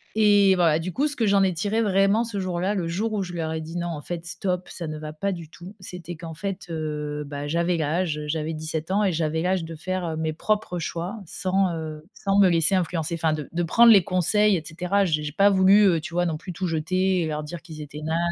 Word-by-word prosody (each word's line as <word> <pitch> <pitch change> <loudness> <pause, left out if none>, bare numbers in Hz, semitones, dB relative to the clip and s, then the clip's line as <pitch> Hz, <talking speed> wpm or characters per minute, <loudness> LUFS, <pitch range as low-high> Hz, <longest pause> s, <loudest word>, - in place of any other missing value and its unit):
et 205 -3 +5
voilà, 165 -3 +3
du 175 +3 -4
coup, 280 +10 +1
ce 290 - -4
que 225 -5 +1
j'en 200 -1 +4
ai 185 -2 +2
tiré 205 +7 0
vraiment 200 +2 +3
ce 225 -4 -4
jour-là, 185 +1 -1
le 180 -5 -2
jour 210 +6 -2
où 205 - 0
je 180 -2 -5
leur 160 -2 -2
ai 160 - -3
dit: 165 +2 -6
«Non 175 0 -2
en 155 -3 -5
fait 170 +2 -6
stop, 180 +1 -3
ça 170 -3 -6
ne 155 - -5
va 155 0 -7
pas 200 +6 -2
du 170 -4 -7
tout», 180 +5 -12
c'était 180 -2 -8
qu'en 165 0 -8
fait, 195 +2 -5
heu, 150 -2 -3
bah, 145 0 -5
j'avais 170 +3 +1
l'âge, 160 +1 0
heu, 150 0 -5
j'avais 160 +1 -2
17 155 +1 -4
ans 205 +2 +2
et 195 - +2
j'avais 160 -1 -1
l'âge 185 -1 +1
de 165 0 -7
faire, 185 +3 -3
heu, 160 - -3
mes 160 0 -1
propres 210 +1 -1
choix 170 +6 -4
sans, 185 0 0
heu, 155 -1 -6
sans 195 0 +1
me 195 -2 +6
laisser 165 +1 +2
influencer. 170 -2 0
Enfin 160 -1 +1
de 150 -2 -5
de 175 +1 -1
prendre 230 +8 +6
les 200 -4 +7
conseils 200 +4 +2
et 160 - -6
cetera. 180 +5 0
J 155 -4 0
j'ai 150 - -4
pas 200 +5 +4
voulu, 195 +2 +6
heu, 170 -5 +3
tu 165 - -8
vois, 175 - +2
non 160 -3 -1
plus 180 +3 -8
tout 185 +2 -3
jeter 185 +3 +1
et 160 - -1
leur 150 -1 -3
dire 165 +2 -7
qu'ils 160 -3 -10
étaient 150 0 -8
nazes 160 +2 -1
175 Hz, 260 wpm, -24 LUFS, 160-195 Hz, -, les